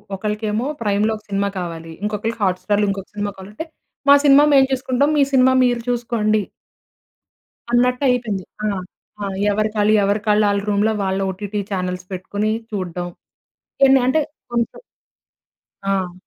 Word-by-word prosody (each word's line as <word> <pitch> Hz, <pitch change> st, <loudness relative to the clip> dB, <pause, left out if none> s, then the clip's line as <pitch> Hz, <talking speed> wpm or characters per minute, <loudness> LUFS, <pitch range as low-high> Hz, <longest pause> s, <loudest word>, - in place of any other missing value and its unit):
ఒకళ్ళకేమో 210 Hz, +4 st, -2 dB
'ప్రైమ్‌లో' 210 Hz, +1 st, +1 dB
ఒక 215 Hz, -, -18 dB
సినిమా 200 Hz, 0 st, 0 dB
కావాలి. 165 Hz, -2 st, -6 dB
ఇంకొకళ్ళకి 215 Hz, +2 st, -2 dB
'హాట్ 185 Hz, -2 st, +1 dB
స్టార్‌లో' 205 Hz, 0 st, +1 dB
ఇంకొక 195 Hz, -1 st, -6 dB
సినిమా 205 Hz, 0 st, -2 dB
కావాలంటే 205 Hz, +10 st, -8 dB, 0.4 s
మా 280 Hz, -, +10 dB
సినిమా 285 Hz, +1 st, +7 dB
మేము 270 Hz, -1 st, +6 dB
చూసుకుంటాం. 260 Hz, +2 st, +1 dB
మీ -, -, +4 dB
సినిమా 260 Hz, 0 st, +5 dB
మీరు 245 Hz, -1 st, +1 dB
చూసుకోండి. 225 Hz, -3 st, 0 dB, 1.3 s
అన్నట్టు 250 Hz, +2 st, +2 dB
అయిపోయింది. 220 Hz, -7 st, -1 dB, 0.2 s
ఆ! -, -, +1 dB, 0.5 s
ఆ! -, -, -2 dB, 0.3 s
ఎవరికాళ్ళు, 215 Hz, 0 st, +1 dB
ఎవరి‌కాళ్ళు 210 Hz, +1 st, +2 dB
ఆళ్ళ 200 Hz, 0 st, +1 dB
రూమ్‌లో 210 Hz, +2 st, +2 dB
వాళ్ళ 190 Hz, 0 st, -1 dB
ఒటిటి 205 Hz, +2 st, -4 dB
చానెల్స్ 180 Hz, -1 st, -3 dB
పెట్టుకొని 205 Hz, +3 st, -2 dB, 0.2 s
చూడడం 180 Hz, -3 st, -4 dB, 0.8 s
ఎన్ని 270 Hz, 0 st, +5 dB
అంటే. 310 Hz, +5 st, +3 dB, 0.3 s
కొన్నిసా 235 Hz, -1 st, -1 dB, 1.1 s
ఆ! 190 Hz, -2 st, -1 dB
210 Hz, 135 wpm, -20 LUFS, 195-235 Hz, 1.3 s, మా